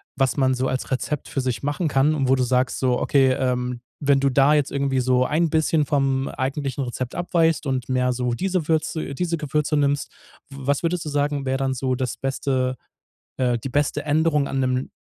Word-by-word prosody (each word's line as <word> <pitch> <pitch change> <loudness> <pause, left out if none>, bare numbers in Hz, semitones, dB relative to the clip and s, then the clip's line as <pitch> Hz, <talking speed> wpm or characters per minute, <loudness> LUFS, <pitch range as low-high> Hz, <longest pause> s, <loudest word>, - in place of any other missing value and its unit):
was 135 +1 +1
man 130 -1 +3
so 130 +1 -1
als 130 +1 -3
Rezept 135 +2 -2
für 135 - -1
sich 125 -1 -3
machen 145 +4 -1
kann 140 +2 +3
und 135 -3 0
wo 135 - +5
du 130 - +1
sagst 125 +1 +1
so: 125 -2 +1
„Okay“, 135 -2 +3
ähm, 125 -2 -1 0.2
wenn 140 -1 +3
du 140 0 +2
da 135 +3 +4
jetzt 150 -2 +1
irgendwie 135 -1 0
so 125 0 +2
ein 160 +4 +1
bisschen 155 -1 +2
vom 135 -1 +1
eigentlichen 140 +1 -3
Rezept 125 0 -5
abweichst 165 -2 +1
und 130 -2 -2
mehr 125 0 +1
so 125 -1 -1
diese 185 0 -1
Würze 160 0 0
äh, - - -6
diese 170 +1 -1
Gewürze 150 0 -1
nimmst 145 0 0 0.4
w 135 - -11
was 140 +3 -1
würdest 170 0 -1
du - - -3
sagen, 145 -1 -1
wär 130 0 0
dann 135 0 0
so 130 0 -1
das 125 -1 -2
beste 130 -1 -1 0.6
äh, 125 -2 +1
die 120 - -6
beste 145 +2 0
Änderung 150 -1 +2
an 135 - -2
'nem 130 0 -1
135 Hz, 210 wpm, -23 LUFS, 130-150 Hz, 0.6 s, wo